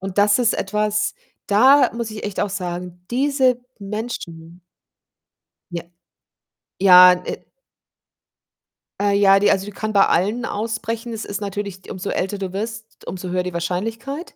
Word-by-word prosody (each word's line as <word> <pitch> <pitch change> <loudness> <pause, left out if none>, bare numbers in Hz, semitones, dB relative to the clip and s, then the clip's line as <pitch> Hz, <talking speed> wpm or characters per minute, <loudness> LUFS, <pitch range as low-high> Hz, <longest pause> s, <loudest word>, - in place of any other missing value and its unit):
und 190 0 -6
das 205 +2 +4
ist 230 - +2
etwas, 210 +1 -1 0.3
da 260 +8 +5
muss 235 -1 -4
ich 215 -1 -7
echt 205 -2 -3
auch 205 - -1
sagen, 180 -2 -6
diese 260 -1 +2 0.2
Menschen 185 -5 -7 1.1
Ja, 170 -1 -4 1.0
ja, 180 -1 +9
äh - - -6 1.5
Äh, 205 0 +2
ja, 195 -1 +5
die 205 - +4
also, 195 0 0
die 205 - -7
kann 215 +1 -4
bei 195 - +5
allen 215 +6 0
ausbrechen. 225 +2 -4
Es 220 - -5
ist 200 0 -5
natürlich 200 -2 -6
umso 185 - -5
älter 190 +2 -2
du 190 -2 -5
wirst, 220 +2 -7
umso 185 -1 -5
höher 180 0 0
die 180 - -5
Wahrscheinlichkeit. 225 - -4
205 Hz, 145 wpm, -21 LUFS, 185-225 Hz, 1.5 s, ja